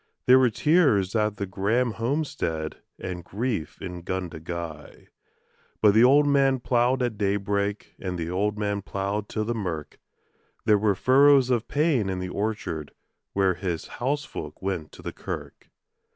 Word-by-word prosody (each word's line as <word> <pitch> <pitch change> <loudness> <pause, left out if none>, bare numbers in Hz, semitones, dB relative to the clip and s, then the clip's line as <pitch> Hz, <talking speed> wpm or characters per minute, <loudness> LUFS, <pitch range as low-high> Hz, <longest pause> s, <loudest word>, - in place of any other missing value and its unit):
There 130 +1 +7
were 130 -2 +4
tears 115 - +3
at 105 -2 +1
the 100 - -2
Grahame 110 +6 0
homestead 115 - -2 0.2
and 90 -2 -6
grief 105 -2 -3
in 90 -2 -6
Gundagai; 85 -3 -6 0.7
But 105 -2 +5
the 110 +2 +6
old 140 +4 +6
man 135 -2 +3
ploughed 125 +1 +2
at 115 -4 -2
daybreak 100 0 -1
and 90 -2 -4
the 80 -1 -3
old 100 +4 -1
man 100 -1 -1
ploughed 100 +2 -3
till 110 -1 -2
the 120 - -1
mirk 90 -9 -5 0.7
There 105 -1 +5
were 105 -1 +2
furrows 135 +3 +5
of 120 -2 +1
pain 145 -9 +1
in 95 - -2
the 90 0 -4
orchard 105 -8 -3 0.4
while 95 -1 +3
his 90 -2 -3
housefolk 125 - -3
went 95 -5 -3
to - - -13
the - - -5
kirk. - - -7
105 Hz, 150 wpm, -26 LUFS, 90-125 Hz, 0.7 s, There